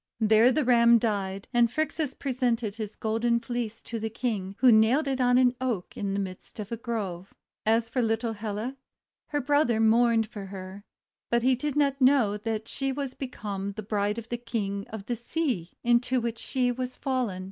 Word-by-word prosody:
There 220 Hz, +2 st, +5 dB
the 290 Hz, +2 st, +1 dB
Ram 235 Hz, -1 st, +6 dB
died, 200 Hz, -4 st, -2 dB
and 240 Hz, -1 st, +4 dB
Phrixus 310 Hz, -1 st, -1 dB
presented 240 Hz, -5 st, -1 dB
his 215 Hz, -2 st, -5 dB
Golden 230 Hz, +2 st, +1 dB
Fleece 235 Hz, -1 st, -4 dB
to 230 Hz, -, -5 dB
the 220 Hz, +1 st, -2 dB
King, 210 Hz, -4 st, -3 dB
wiio 255 Hz, -3 st, +7 dB
nailed 235 Hz, +7 st, +4 dB
it 265 Hz, -1 st, 0 dB
on 245 Hz, 0 st, +4 dB
an 250 Hz, -1 st, +4 dB
Oak 235 Hz, -9 st, -2 dB
in 195 Hz, -1 st, -2 dB
the -, -, 0 dB
midst 190 Hz, +3 st, -7 dB
of 210 Hz, 0 st, -6 dB
a -, -, -1 dB
grove. 205 Hz, -6 st, -5 dB, 0.3 s
As 225 Hz, +1 st, +3 dB
for 240 Hz, +2 st, -1 dB
little 225 Hz, 0 st, 0 dB
Helle, 215 Hz, +3 st, -4 dB, 0.5 s
her 290 Hz, -1 st, -1 dB
brother 280 Hz, -4 st, +2 dB
mourned 225 Hz, 0 st, +4 dB
for 205 Hz, -3 st, -8 dB
her; 190 Hz, +1 st, -8 dB, 0.5 s
but 235 Hz, 0 st, +2 dB
he 260 Hz, +1 st, +4 dB
did 285 Hz, +3 st, -2 dB
not 280 Hz, -2 st, +1 dB
know 255 Hz, -6 st, +4 dB
that 220 Hz, +1 st, -3 dB
she 270 Hz, -1 st, -2 dB
was 270 Hz, -1 st, -4 dB
become 200 Hz, -6 st, -5 dB
the 215 Hz, -, -6 dB
bride 205 Hz, 0 st, -1 dB
of 230 Hz, 0 st, -7 dB
the 240 Hz, -, -2 dB
King 200 Hz, -4 st, -3 dB
of 215 Hz, -3 st, -8 dB
the 240 Hz, -, -2 dB
sea 240 Hz, -, -2 dB
into 240 Hz, +2 st, +3 dB
which 235 Hz, -1 st, -3 dB
she 250 Hz, -2 st, 0 dB
was 255 Hz, +1 st, -4 dB
fallen. 255 Hz, -9 st, -1 dB
230 Hz, 190 wpm, -27 LUFS, 210-250 Hz, 0.5 s, wiio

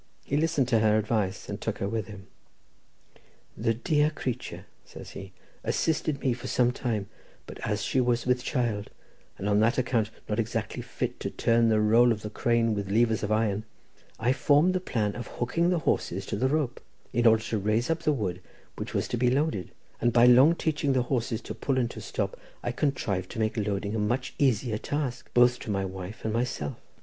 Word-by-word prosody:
He 140 Hz, -, -1 dB
listened 150 Hz, -4 st, +2 dB
to 115 Hz, -3 st, +4 dB
her 110 Hz, 0 st, +4 dB
advice, 105 Hz, -3 st, -1 dB
and -, -, -5 dB
took -, -, -2 dB
her 100 Hz, -, -2 dB
with 110 Hz, -1 st, -2 dB
him. 105 Hz, -3 st, -10 dB, 1.3 s
"The 115 Hz, -, 0 dB
dear 150 Hz, +6 st, +2 dB
creature," 130 Hz, -5 st, -5 dB, 0.2 s
says -, -, -11 dB
he, -, -, -9 dB, 0.3 s
"assisted 155 Hz, -3 st, 0 dB
me 130 Hz, -, +2 dB
for 120 Hz, -, -7 dB
some 125 Hz, -1 st, +2 dB
time, 110 Hz, -6 st, -2 dB, 0.4 s
but -, -, -10 dB
as 105 Hz, -1 st, -2 dB
she 130 Hz, -, +1 dB
was 120 Hz, -1 st, +1 dB
with 125 Hz, 0 st, +1 dB
child, 115 Hz, -8 st, -1 dB, 0.5 s
and 100 Hz, -, -3 dB
on 105 Hz, 0 st, +3 dB
that 115 Hz, +4 st, +3 dB
account 120 Hz, -4 st, +1 dB, 0.2 s
not 105 Hz, +1 st, -1 dB
exactly 115 Hz, -1 st, -2 dB
fit -, -, -4 dB
to -, -, -3 dB
turn 115 Hz, 0 st, +2 dB
the 110 Hz, -1 st, +3 dB
roll 115 Hz, +3 st, +5 dB
of 110 Hz, -2 st, -2 dB
the 105 Hz, -, -5 dB
crane 115 Hz, 0 st, +2 dB
with 100 Hz, -2 st, -3 dB
levers 110 Hz, +1 st, +2 dB
of 105 Hz, -, -2 dB
iron, 110 Hz, -1 st, +1 dB, 0.6 s
I 120 Hz, +3 st, +2 dB
formed 145 Hz, +7 st, +4 dB
the 185 Hz, -, +1 dB
plan 105 Hz, -, -1 dB
of 120 Hz, -, -6 dB
hooking 165 Hz, +8 st, 0 dB
the 180 Hz, -, +2 dB
horses 160 Hz, -, -1 dB
to -, -, -3 dB
the 130 Hz, -, +1 dB
rope, 140 Hz, -3 st, -1 dB, 0.3 s
in 120 Hz, -1 st, +4 dB
order 110 Hz, -1 st, +5 dB
to 110 Hz, -, -1 dB
raise 110 Hz, +7 st, +1 dB
up 165 Hz, 0 st, -1 dB
the 155 Hz, -, +2 dB
wood 95 Hz, -9 st, -2 dB, 0.4 s
which -, -, -5 dB
was -, -, 0 dB
to 120 Hz, -, -1 dB
be 125 Hz, +1 st, +3 dB
loaded, 130 Hz, -, 0 dB, 0.3 s
and 120 Hz, -, +3 dB
by 120 Hz, +1 st, +6 dB
long 130 Hz, +7 st, +7 dB
teaching 150 Hz, -4 st, 0 dB
the 130 Hz, -1 st, +2 dB
horses 120 Hz, -3 st, -1 dB
to -, -, -6 dB
pull 135 Hz, -2 st, -1 dB
and 120 Hz, -2 st, +1 dB
to -, -, -8 dB
stop, -, -, -3 dB, 0.3 s
I 120 Hz, -, -1 dB
contrived 115 Hz, -, -1 dB
to -, -, -5 dB
make 110 Hz, 0 st, 0 dB
loading 105 Hz, -1 st, -1 dB
a 110 Hz, -, -1 dB
much 120 Hz, +5 st, -1 dB
easier 120 Hz, -5 st, +2 dB
task, 140 Hz, -4 st, -3 dB
both 125 Hz, 0 st, +5 dB
to -, -, -8 dB
my 100 Hz, -2 st, 0 dB
wife 95 Hz, +3 st, -7 dB
and 110 Hz, -, 0 dB
myself. 115 Hz, -11 st, -2 dB
120 Hz, 205 wpm, -28 LUFS, 105-130 Hz, 1.3 s, long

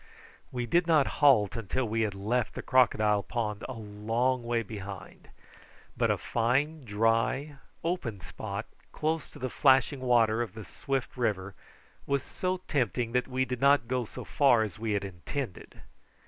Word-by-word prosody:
We 125 Hz, -1 st, -2 dB
did 170 Hz, +8 st, +2 dB
not 155 Hz, -4 st, +5 dB, 0.2 s
halt 120 Hz, -8 st, +5 dB
until 115 Hz, +3 st, -2 dB
we 115 Hz, +1 st, 0 dB
had 105 Hz, -3 st, -1 dB
left 110 Hz, +5 st, -1 dB
the -, -, -5 dB
crocodile 110 Hz, -5 st, +3 dB
pond 105 Hz, 0 st, -3 dB
a -, -, -3 dB
long 115 Hz, +4 st, -1 dB
way 115 Hz, 0 st, 0 dB
behind; 100 Hz, -3 st, -9 dB, 0.7 s
but -, -, +1 dB
a -, -, +2 dB
fine 135 Hz, +7 st, 0 dB
dry, 115 Hz, +7 st, +1 dB, 0.3 s
open 160 Hz, -, -2 dB
spot, -, -, -5 dB, 0.3 s
close 160 Hz, -1 st, -2 dB
to -, -, -14 dB
the 130 Hz, -, -3 dB
flashing 135 Hz, 0 st, +4 dB
water 120 Hz, -3 st, +3 dB
of 110 Hz, -4 st, -4 dB
the 110 Hz, -2 st, -8 dB
swift 135 Hz, -4 st, -3 dB
river, 100 Hz, -5 st, -1 dB, 0.5 s
was 140 Hz, -1 st, +1 dB
so 185 Hz, 0 st, -3 dB
tempting 125 Hz, -4 st, 0 dB
that 125 Hz, +1 st, +1 dB
we 130 Hz, 0 st, 0 dB
did 125 Hz, -1 st, -4 dB
not 140 Hz, -4 st, +4 dB
go 125 Hz, 0 st, 0 dB
so -, -, -8 dB
far 125 Hz, -6 st, +4 dB
as 110 Hz, +1 st, -6 dB
we 110 Hz, -1 st, -1 dB
had 100 Hz, -1 st, -1 dB
intended. 95 Hz, -, -6 dB
120 Hz, 160 wpm, -29 LUFS, 110-135 Hz, 0.7 s, not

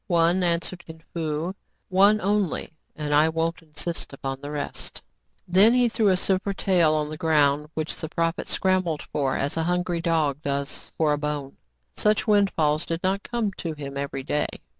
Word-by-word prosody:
" -, -, -51 dB
One," 170 Hz, +1 st, +3 dB
answered 175 Hz, +1 st, -1 dB
Kin 160 Hz, -1 st, -12 dB
Fo, 160 Hz, +1 st, -2 dB, 0.2 s
" -, -, -47 dB
one 200 Hz, +3 st, +5 dB
only, 200 Hz, -4 st, 0 dB, 0.2 s
and 150 Hz, -1 st, -2 dB
I 150 Hz, +2 st, +5 dB
won't 165 Hz, +2 st, -1 dB
insist 165 Hz, 0 st, -5 dB
upon 135 Hz, 0 st, -5 dB
the 145 Hz, -, -6 dB
rest." 150 Hz, -1 st, -5 dB, 0.4 s
Then 195 Hz, +7 st, +6 dB
he 250 Hz, -1 st, +4 dB
threw 220 Hz, -2 st, +1 dB
a 185 Hz, -2 st, +4 dB
silver 195 Hz, +1 st, 0 dB
tael 175 Hz, -6 st, +3 dB
on 150 Hz, -1 st, 0 dB
the 155 Hz, -, -6 dB
ground, 150 Hz, -2 st, +2 dB
which 155 Hz, 0 st, -2 dB
the 160 Hz, -, -6 dB
prophet 165 Hz, +1 st, -1 dB
scrambled 185 Hz, -5 st, 0 dB
for 135 Hz, -3 st, -1 dB
as 140 Hz, +3 st, -2 dB
a 165 Hz, -, +1 dB
hungry 180 Hz, -1 st, 0 dB
dog 155 Hz, -4 st, +1 dB
does 140 Hz, -1 st, -3 dB
for 155 Hz, -2 st, +3 dB
a 145 Hz, -, -1 dB
bone. 150 Hz, -2 st, -3 dB, 0.4 s
Such 210 Hz, -1 st, +2 dB
windfalls 170 Hz, -8 st, +2 dB
did 165 Hz, 0 st, -3 dB
not 190 Hz, +2 st, +1 dB
come 230 Hz, -3 st, -2 dB
to 165 Hz, -2 st, -3 dB
him 140 Hz, -2 st, -7 dB
every 140 Hz, -1 st, -3 dB
day. 150 Hz, +2 st, 0 dB
165 Hz, 185 wpm, -25 LUFS, 150-185 Hz, 0.4 s, Then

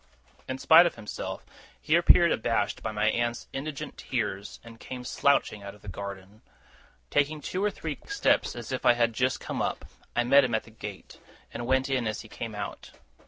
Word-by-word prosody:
In 130 Hz, -, -2 dB
spite 165 Hz, +5 st, +7 dB
of -, -, -4 dB
himself, 110 Hz, -2 st, -6 dB, 0.3 s
he 155 Hz, -, +2 dB
appeared 170 Hz, 0 st, +6 dB
abashed 110 Hz, -2 st, 0 dB
by 110 Hz, -, -3 dB
my 105 Hz, 0 st, +2 dB
aunt's 120 Hz, 0 st, -2 dB
indignant 140 Hz, +1 st, -5 dB
tears, 100 Hz, +1 st, -3 dB
and 115 Hz, -1 st, -13 dB
came 125 Hz, -1 st, -7 dB
slouching 135 Hz, -5 st, +2 dB
out 100 Hz, 0 st, -8 dB
of 105 Hz, -, -21 dB
the -, -, -13 dB
garden. 100 Hz, +1 st, -7 dB, 0.7 s
Taking 150 Hz, +2 st, +1 dB
two 185 Hz, +6 st, -3 dB
or 210 Hz, -, +3 dB
three 160 Hz, -6 st, -5 dB
quick -, -, -15 dB
steps, 410 Hz, -, +2 dB
as 120 Hz, 0 st, -7 dB
if 130 Hz, -, -3 dB
I 120 Hz, -, +7 dB
had 115 Hz, -1 st, +1 dB
just 130 Hz, +3 st, +1 dB
come -, -, -4 dB
up, -, -, -2 dB, 0.3 s
I 120 Hz, -, +3 dB
met 140 Hz, +3 st, +6 dB
him 120 Hz, -3 st, +1 dB
at 110 Hz, -, -1 dB
the 115 Hz, -, -16 dB
gate, 105 Hz, -3 st, -9 dB, 0.3 s
and 120 Hz, +1 st, -5 dB
went 130 Hz, 0 st, +2 dB
in 130 Hz, -4 st, 0 dB
as 110 Hz, 0 st, -3 dB
he 110 Hz, -, -12 dB
came 110 Hz, 0 st, -6 dB
out. 105 Hz, -1 st, -6 dB
120 Hz, 205 wpm, -28 LUFS, 110-140 Hz, 0.7 s, spite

